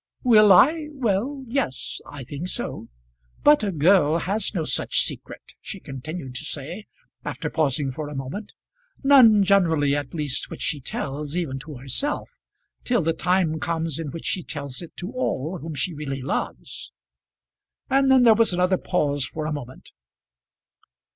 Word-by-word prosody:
"Will 215 -5 +7
I? 305 - +6
Well, 260 +2 -1
yes; 235 - -3
I 145 -2 -8
think 145 +7 -6
so. - - -4 0.5
But 295 0 +6
a 200 - 0
girl 160 -1 +4
has 195 +4 -1
no 175 -6 -2
such - - +1
secret," - - -7
she 195 - -7
continued 135 -1 -7
to 150 - -5
say, 160 +8 -6 0.4
after - - -4
pausing 140 -2 0
for 150 +3 -5
a 150 - -7
moment. 135 +11 -5 0.5
"None, 245 -7 +7
generally, 165 -8 +3
at 145 +1 -4
least, 150 -4 -2
which - - -7
she 145 - -2
tells, 145 +4 -4
even 140 -7 -2
to 150 +1 -9
herself, 135 - -3 0.5
till 240 -7 +1
the 165 +1 +1
time 175 -2 +1
comes 165 -2 -2
in 160 -3 -4
which 165 +3 -8
she 185 - -1
tells 140 -4 -5
it 170 - -11
to 180 +5 -5
all 185 - -2
whom 160 0 -6
she 155 +6 -1
really 135 -3 -5
loves." 135 - -4 1.0
And 270 0 +3
then 260 -1 +6
there 230 -2 +8
was 225 -3 +4
another 180 +1 +2
pause 145 -6 0
for 155 +1 -5
a 155 - -2
moment. 130 -3 -8
165 Hz, 160 wpm, -24 LUFS, 145-205 Hz, 1.0 s, there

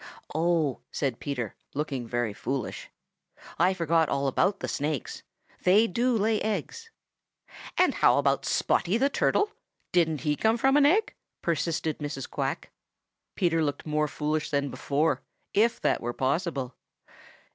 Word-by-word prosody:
"Oh!" 160 -3 +1
said 135 -5 -2
Peter, 125 -7 -3 0.2
looking 140 -5 -3
very 120 -3 -1
foolish. 130 +3 -4 0.7
"I 185 +3 +4
forgot 165 -2 +2
all 140 0 0
about 195 +9 +1
the - - -4
Snakes. 145 -2 -3 0.4
They 200 +5 +5
do 235 +4 +1
lay 215 +1 +1
eggs." 455 - -3 0.9
"And - - +4
how - - +4
about - - +2
Spotty 185 +5 +1
the 275 +3 +2
Turtle? 415 +7 +2 0.4
Didn't 160 -4 +2
he 150 -1 +1
come 220 +8 +2
from 270 +3 +3
an 290 -1 +6
egg?" 415 +8 +2 0.3
persisted 160 -2 -1
Mrs. 145 -3 -4
Quack. - - -3 0.6
Peter 165 -3 +2
looked 145 -1 -2
more 150 -1 +1
foolish 150 +1 -2
than 140 -1 0
before, 150 +3 0 0.3
if 225 +3 +3
that - - +1
were 120 +1 -3
possible. 135 -1 -1
160 Hz, 140 wpm, -27 LUFS, 140-200 Hz, 0.9 s, an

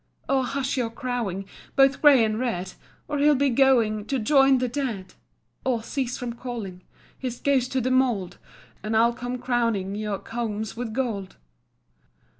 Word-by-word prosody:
"Oh, 270 -1 +2
hush 270 +1 -2
your 240 -3 0
crowing, 230 -6 -3 0.3
Both 270 -1 +4
grey 275 -6 +7
and 215 0 -1
red, 190 -7 -2 0.3
Or 295 -1 -2
he'll 295 +1 +5
be 275 0 +2
going 230 -5 +3
To 270 - -1
join 270 +3 +4
the 255 0 0
dead; 235 -8 -4 0.5
Or, 240 -4 0
cease 255 -1 -3
from 245 -1 -4
calling 230 -7 -6 0.4
His 250 -2 -4
ghost 265 -3 +1
to 260 - +1
the 255 +2 0
mould, 235 -9 +1 0.4
And 215 +2 -1
I'll 235 +1 +4
come 245 +1 -4
crowning 230 -6 0
Your 210 -1 -2
combs 220 -1 -4
with 235 -1 -4
gold." 215 -6 -3
240 Hz, 160 wpm, -25 LUFS, 215-265 Hz, 0.5 s, grey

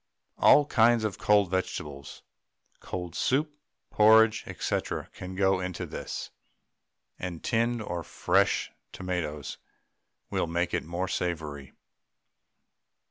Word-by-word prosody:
All 145 - +7
kinds 120 -3 +4
of 105 -2 -3
cold 105 -4 +3
vegetables, 75 -6 -4 0.6
cold 90 -3 -6
soup, 150 +3 0 0.4
porridge, 110 0 +5 0.2
&c., - - +1 0.3
can 90 +1 -8
go 95 0 +2
into 90 -1 -4
this, - - -6 0.9
and 90 -3 -5
tinned 115 0 0
or 85 -3 -4
fresh - - +1 0.2
tomatoes 85 -6 -4 0.7
will - - 0
make 85 +2 -1
it - - 0
more 85 +3 -3
savoury. 75 -7 -4
90 Hz, 105 wpm, -28 LUFS, 85-110 Hz, 0.9 s, All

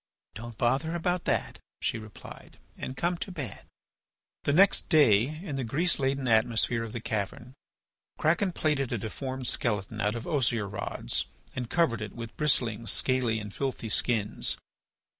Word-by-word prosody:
"Don't 115 0 -8
bother 140 +7 +1
about 175 +1 0
that," - - 0 0.2
she - - -1
replied, 110 -2 -11 0.2
"and 130 - -6
come 175 +1 +1
to 190 - -5
bed." 140 - -6 0.8
The - - +3
next 190 +6 +5
day 145 - +5
in 145 -8 -4
the 135 - -1
grease 155 +9 +1
laden 135 -1 0
atmosphere 115 +1 +3
of 115 - -6
the 120 - -4
cavern, 110 +3 -3 0.6
Kraken 175 +5 +2
plaited 150 -6 0
a 120 - 0
deformed 130 +5 -4
skeleton 105 -3 -1
out 105 +2 +1
of 115 - -5
osier 120 -7 +1
rods 100 - -2 0.3
and 125 -2 -3
covered 135 -10 +2
it 105 -1 -5
with 115 -1 -7
bristling, 120 -7 +1
scaly, 125 -4 +2
and 105 -1 -7
filthy 130 -4 -3
skins. 105 -1 +1
120 Hz, 155 wpm, -29 LUFS, 110-145 Hz, 0.8 s, next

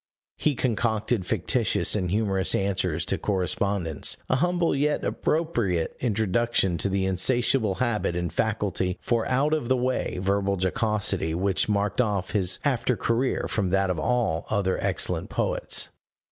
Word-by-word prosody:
He 150 -2 +1
concocted 115 -4 0
fictitious - - +1
and 90 -4 -1
humorous 100 -1 +1
answers 90 -5 0
to - - -1
correspondents 95 -3 -1
a 130 - +3
humble 175 0 +1
yet 145 +2 0
appropriate 120 - -1
introduction 110 -4 +1
to 100 - +1
the 95 0 0
insatiable 110 +3 +2
habit 110 -5 -1
and 85 -2 -2
faculty 100 -3 -1
for 115 -2 0
out 140 +4 +1
of 150 -6 -1
the 130 - +3
way 125 -4 -1
verbal 100 +1 0
jocosity 95 -3 0
which 95 +3 +1
marked 105 +2 +1
off 100 -5 -1
his 95 -3 +1
after 125 -3 +1
career 120 +3 0
from 100 -4 -1
that 95 0 +2
of 85 - -3
all 85 -2 0
other 100 -3 0
excellent - - -1
poets. - - -1
105 Hz, 145 wpm, -26 LUFS, 95-120 Hz, -, a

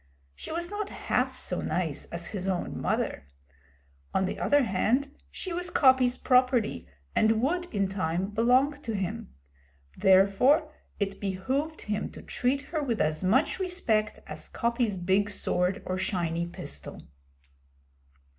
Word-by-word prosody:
She - - -9
was 345 +3 -2
not 415 -1 -3
half - - -1
so - - -3
nice - - -2
as - - -6
his 195 -3 -4
own 185 -2 -2
mother. 70 - -1 0.9
On 190 - +3
the - - -4
other 290 -1 +3
hand, 250 +7 +1 0.2
she 370 - -5
was 355 +1 -1
Coppy's 260 -4 +4
property, 250 - +2 0.3
and 220 0 +4
would 350 +6 +1
in 200 - -1
time 185 0 -2
belong 255 +6 +3
to 230 -6 -3
him. 185 - -4 0.6
Therefore 245 - +4 0.3
it 200 -1 -2
behoved 260 +11 -2
him 210 0 -2
to - - -10
treat 270 +3 0
her 310 +2 -3
with 240 -6 -1
as 155 +3 0
much 260 - +2
respect 300 - 0
as - - -7
Coppy's 235 -4 0
big 190 +3 +2
sword 185 -1 -1
or 185 0 -2
shiny 170 -3 -1
pistol. 70 - -7
220 Hz, 140 wpm, -28 LUFS, 190-280 Hz, 0.9 s, Coppy's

